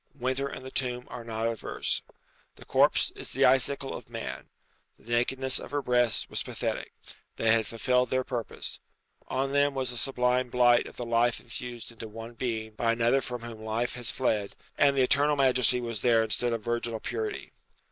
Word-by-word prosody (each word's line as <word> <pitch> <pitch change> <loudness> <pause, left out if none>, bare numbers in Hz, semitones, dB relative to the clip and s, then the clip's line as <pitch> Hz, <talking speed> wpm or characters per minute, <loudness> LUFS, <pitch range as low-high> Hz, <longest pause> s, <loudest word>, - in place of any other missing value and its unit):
Winter 130 +1 -1
and 130 -1 -8
the 130 - -7
tomb 125 -1 -1
are 120 -1 -6
not 115 0 -2
adverse. 115 -1 -2 0.5
The - - -14
corpse - - +3
is - - -5
the - - +3
icicle 135 +1 +2
of 120 - -9
man. 115 -1 -6 0.5
The 120 - -12
nakedness 130 +2 +1
of - - -8
her 145 -1 -2
breasts 120 -3 +2
was - - -2
pathetic. - - -3 0.4
They 115 - +2
had 115 -1 +3
fulfilled 125 +2 +1
their 130 0 +1
purpose. 120 -3 -3 0.5
On 135 +1 -1
them 140 0 +2
was 130 -2 -1
a 120 - -5
sublime 125 +1 +1
blight 120 -1 +4
of - - -12
the 120 - -4
life 115 0 +2
infused 120 0 -7
into 115 -1 -8
one 115 +2 -9
being 110 -2 -3
by 115 +1 +1
another 120 +3 +3
from 125 -2 -6
whom 115 -2 -8
life 110 +3 -1
has 120 -2 -4
fled, 105 -6 -1 0.2
and 140 -1 +4
maternal 140 +3 +3
majesty 130 -3 +4
was 115 -4 -4
there 115 -2 +4
instead 120 +2 +3
of 115 -2 -2
virginal 120 -1 -1
purity. 110 -1 -4
120 Hz, 185 wpm, -28 LUFS, 115-130 Hz, 0.5 s, blight